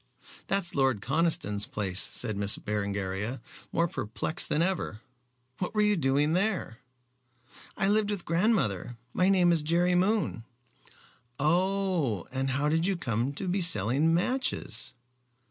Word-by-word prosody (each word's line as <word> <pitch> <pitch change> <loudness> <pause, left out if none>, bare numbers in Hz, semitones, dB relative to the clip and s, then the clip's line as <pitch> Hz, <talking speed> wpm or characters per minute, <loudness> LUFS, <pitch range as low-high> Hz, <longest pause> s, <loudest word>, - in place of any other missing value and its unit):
"That's 195 -3 +1
Lord 135 -5 +2
Conniston's 150 - 0
place," 95 -3 -2
said 110 -1 +1
Miss 100 0 +1
Berengaria, 100 +2 -3 0.3
more 170 +1 +1
perplexed 130 +3 -1
than 155 - +2
ever. 175 - -2 0.6
"What 180 +3 -3
were 210 - +3
you 210 0 +3
doing 145 0 +1
there?" 185 - 0 1.0
"I 195 - +1
lived 210 0 +2
with 205 -4 -3
grandmother. 165 - 0 0.2
My 185 +1 +2
name 180 -3 +4
is 165 -2 +2
Jerry 170 +4 +2
Moon." 190 - +1 0.9
"Oh! 175 - 0
And 135 +1 -2
how 140 +2 0
did 165 +3 +1
you 195 -2 0
come 120 -3 -1
to 185 +6 -5
be 185 +2 0
selling 150 - +3
matches?" 175 - -2
160 Hz, 135 wpm, -28 LUFS, 115-185 Hz, 1.0 s, name